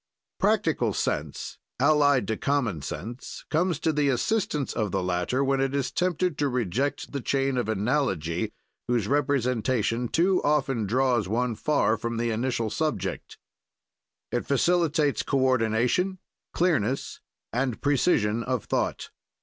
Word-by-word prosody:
"Practical - - +2
sense, - - -3 0.2
allied 145 -2 +4
to 110 - 0
common 120 - 0
sense, 120 - -7
comes 170 +1 +1
to 160 0 0
the 145 -1 +2
assistance 150 - 0
of 105 -2 -1
the 95 0 -1
latter, 90 +9 0
when 135 0 +1
it 135 +1 0
is 140 -2 -1
tempted 180 -2 0
to 145 -1 +2
reject 125 +3 -1
the 140 - -3
chain 135 +1 0
of 120 -3 -1
analogy, 105 - 0 0.4
whose 120 -4 +1
representation 125 -4 +1
too 180 +7 +2
often 135 -7 +1
draws 125 -2 +2
one 120 +4 0
far 125 -2 +1
from 115 +1 -3
the 115 0 0
initial 115 -1 -1
subject. 155 +3 -3 0.9
"It 120 - -2
facilitates 155 0 +2
coordination, 130 - +1 0.3
clearness, 145 - 0 0.3
and 125 -1 -1
precision 120 -6 +2
of 125 0 -2
thought. - - -2
130 Hz, 130 wpm, -26 LUFS, 115-145 Hz, 0.9 s, allied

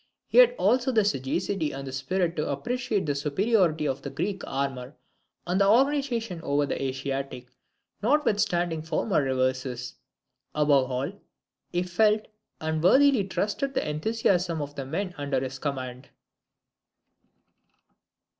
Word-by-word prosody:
He - - +4
had - - +7
also 255 +1 +2
the 220 -4 +3
sagacity 165 +1 -1
and 135 0 -6
the 135 - -6
spirit 170 +6 -1
to 150 - -2
appreciate 220 - -1
the 145 - 0
superiority 160 +2 +1
of 135 0 -2
the 140 - -5
Greek 185 +7 -3
armour 135 -1 -3 0.5
and 180 +3 +1
organization 235 - +2
over 145 -1 +1
the 140 - -3
Asiatic, 135 -1 -3 0.6
notwithstanding 205 - +1
former 160 +2 0
reverses. 130 -2 -1 0.6
Above 145 -3 +3
all, 130 +6 -2 0.6
he 175 0 0
felt 210 +4 +2 0.3
and 160 0 -2
worthily 265 +3 +5
trusted 215 +8 -2
the - - 0
enthusiasm 175 0 0
of 145 -1 -5
the 135 -2 -6
men 185 +6 -3
under 140 -2 0
his 135 +1 -5
command. 130 -2 -5
160 Hz, 125 wpm, -27 LUFS, 135-205 Hz, 0.6 s, had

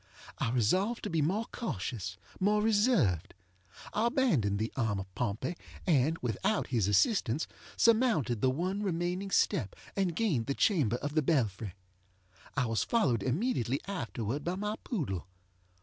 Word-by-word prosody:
I - - +1
resolved 185 - +1
to - - -3
be 165 -2 +1
more 195 +10 +1
cautious, 95 - -4 0.2
more 210 +2 +3
reserved. 205 - +2 0.6
I 220 +3 +2
abandoned 180 - +2
the 110 +2 -2
arm 110 -6 0
of 95 -1 -8
Pompey, 120 - -2 0.3
and, 155 -1 +3
without 190 - 0
his 110 -6 +2
assistance, 115 - +2 0.3
surmounted 220 - +3
the 130 - +4
one 185 +9 -1
remaining 180 0 -1
step, 105 - +1 0.2
and 185 -4 0
gained 165 - +1
the 140 - -1
chamber 145 - +2
of 145 +4 -4
the 155 - +3
belfry. 110 - 0 0.8
I 135 - +3
was 115 -1 0
followed 135 - +2
immediately 135 - 0
afterward 130 - -3
by 175 +2 -1
my 210 +2 -2
poodle. 115 - -3
150 Hz, 145 wpm, -31 LUFS, -, 0.8 s, the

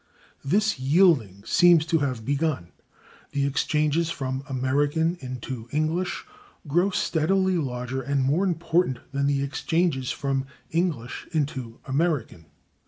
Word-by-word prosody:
This 200 +4 +1
yielding 135 - +3
seems 170 +3 +5
to 165 0 +2
have 130 -6 -2
begun; 140 - -1 0.6
the 140 -1 +1
exchanges 150 +3 +1
from 135 -4 -3
[Pg318] 140 - -19
American 145 +6 +1
into 125 -2 -6
English 155 +4 -1 0.4
grow 175 +7 +2
steadily 185 +1 +1
larger 125 -2 -3
and 140 +1 0
more 145 +8 +2
important 170 -5 +1
than 140 0 0
the 140 -1 +1
exchanges 145 -1 0
from 135 -1 -1 0.2
English 160 -8 -2
into 135 -7 -2
American. 135 - -1
145 Hz, 120 wpm, -25 LUFS, 130-165 Hz, 0.6 s, seems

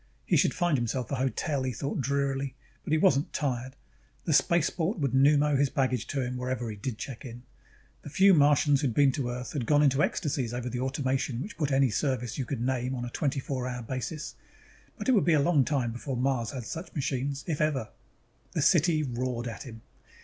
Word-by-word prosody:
He - - +2
should - - +3
find 175 -7 +1
himself 120 +1 -2
a - - +1
hotel, 135 +2 -1
he 130 0 -1
thought 140 +4 -3
drearily, 140 -1 -1 0.3
but - - -5
he 155 - +4
wasn't 140 -2 +3
tired; 130 -2 -2 0.5
the 160 - +1
spaceport 170 +5 +2
would 140 -6 0
pneumo 145 +2 +4
his 140 0 +2
baggage 130 -4 0
to 140 - -2
him 125 0 -3
whenever 125 -2 -3
he - - -7
did 110 +3 -5
check 125 -1 -7
in. 120 -2 -9 0.6
The - - -9
few 190 +6 +5
Martians 145 -2 +4
who 145 - +1
had 115 - -3
been 140 -2 +5
to 125 -2 -2
Earth 125 +1 -5
had 135 -6 -3
gone 150 0 +4
into 140 0 +3
ecstasies 135 -9 -1
over 125 0 -3
the 125 +1 -4
automation 130 -1 -1
which 205 - -8
put 150 -3 -1
any 135 -2 +3
service 125 0 -1
you 130 - -1
could 130 -3 -4
name 130 +1 -1
on 120 -1 -4
a 120 - -6
twenty 140 -1 -1
four 130 -1 -3
hour 125 -1 -4
basis. 130 +5 -5 0.6
But - - -5
it - - +5
would 215 -7 +4
be 170 - +3
a 155 - +4
long 145 -1 +3
time 130 -4 0
before 125 +2 -4
Mars 125 -2 0
had 130 -4 -6
such 165 +9 -7
machines. 140 -1 -2
If 155 -4 -2
ever. 145 -7 0 0.6
The - - 0
city 165 -2 +4
roared 125 -2 -3
at 115 +3 -7
him. 115 -2 -10
135 Hz, 215 wpm, -28 LUFS, 125-145 Hz, 0.6 s, few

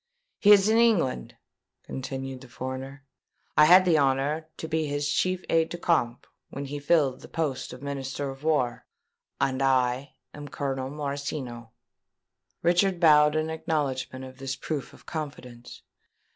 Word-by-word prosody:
"He 205 - +6
is 200 -1 +7
in 220 +1 +4
England," 185 - +2 0.5
continued 135 0 -6
the 130 - -12
foreigner. 130 +3 -7 0.5
"I 150 - +7
had 180 +3 +7
the 165 -4 +4
honour 140 +3 +1
to 160 - -5
be 160 -1 -1
his 145 0 -1
chief 185 +5 0
aide 165 0 +2
de 175 - -5
camp, 125 -9 0 0.2
when 140 +1 -6
he 145 +1 -5
filled 145 -3 +2
the - - -11
post 150 -5 -3
of 125 +2 -10
Minister 140 0 -4
of 135 +2 -12
War; 145 -7 0 0.5
and 130 0 0
I 130 0 +1 0.2
am 145 0 -8
Colonel 135 -2 -3
Morosino." 140 -5 -5 0.9
Richard 180 +2 +3
bowed 150 -2 +6
an 155 0 0
acknowledgment 135 -5 -2
of 130 0 -12
this 135 -1 -3
proof 145 -1 -4
of - - -18
confidence. 125 -6 -8
140 Hz, 150 wpm, -27 LUFS, 130-160 Hz, 0.9 s, is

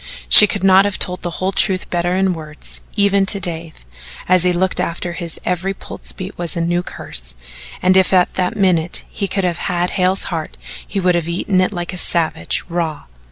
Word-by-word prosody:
She 210 - +10
could 200 -1 -3
not 190 0 +6
have 205 -1 -1
told 180 0 -2
the 175 - -3
whole 185 +1 -1
truth 190 -1 +1
better 175 +1 0
in 190 -1 +1
words, 155 -2 -10
even 200 -1 +2
to 200 - -3
Dave, 165 - -4 0.4
and 185 - +3
as 185 - +5
he 180 - +3
looked 180 +1 -1
after 170 +1 -3
her - - -6
his 170 -2 -5
every 185 +2 -2
pulse - - -4
beat 190 +2 -8
was 175 0 -1
a - - -1
new 175 +1 0
curse, - - -6 0.5
and 185 +1 +4
if 190 -1 +3
at 180 -2 +3
that 180 -1 -2
minute 180 -4 0
he 200 - -3
could 195 +1 -2
have 175 -1 -1
had 175 0 -1
Hale's 185 0 +1
heart 160 - -5 0.3
he - - -3
would 180 -1 +2
have 170 -2 -1
eaten 185 +2 0
it 185 - 0
like 175 -1 -5
a - - -6
savage 160 - +1
raw. 165 -3 -3
180 Hz, 215 wpm, -17 LUFS, 170-190 Hz, 0.5 s, She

